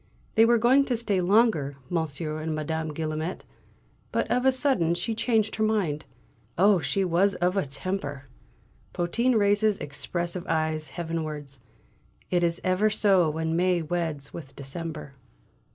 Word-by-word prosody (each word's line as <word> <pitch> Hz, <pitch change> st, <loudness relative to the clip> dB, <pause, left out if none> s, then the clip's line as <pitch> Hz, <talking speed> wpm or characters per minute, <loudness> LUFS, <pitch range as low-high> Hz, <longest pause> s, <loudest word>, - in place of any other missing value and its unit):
They 225 Hz, -, +6 dB
were 235 Hz, +1 st, +4 dB
going 250 Hz, +5 st, +5 dB
to 245 Hz, -3 st, 0 dB
stay 205 Hz, -5 st, 0 dB
longer, 180 Hz, -, +2 dB
Monsieur 155 Hz, -1 st, -2 dB
and 155 Hz, 0 st, -2 dB
Madame 160 Hz, +1 st, -3 dB
Guillaumet, 155 Hz, +3 st, -4 dB, 0.7 s
but -, -, 0 dB
of 250 Hz, +1 st, +2 dB
a -, -, +6 dB
sudden 255 Hz, -, +2 dB
she 185 Hz, +6 st, -2 dB
changed 220 Hz, -1 st, 0 dB
her 220 Hz, -, +1 dB
mind. 190 Hz, -9 st, 0 dB, 0.5 s
Oh, 195 Hz, +1 st, +5 dB
she 195 Hz, +3 st, 0 dB
was 185 Hz, +3 st, +2 dB
of 180 Hz, +1 st, 0 dB
a 195 Hz, -7 st, 0 dB
temper!" 145 Hz, -1 st, -4 dB, 0.7 s
Potin 235 Hz, +9 st, +1 dB
raises 205 Hz, 0 st, +3 dB
expressive 170 Hz, +5 st, -4 dB
eyes 155 Hz, -1 st, 0 dB
heavenwards. 155 Hz, -5 st, -4 dB, 0.7 s
"It 175 Hz, -1 st, +2 dB
is 170 Hz, 0 st, +1 dB
ever 185 Hz, +3 st, +2 dB
so 195 Hz, -6 st, +3 dB
when 160 Hz, +1 st, -2 dB
May 180 Hz, -1 st, +2 dB
weds 160 Hz, -4 st, -3 dB
with 140 Hz, -5 st, -9 dB
December." 150 Hz, +1 st, -6 dB
175 Hz, 145 wpm, -26 LUFS, 155-205 Hz, 0.7 s, They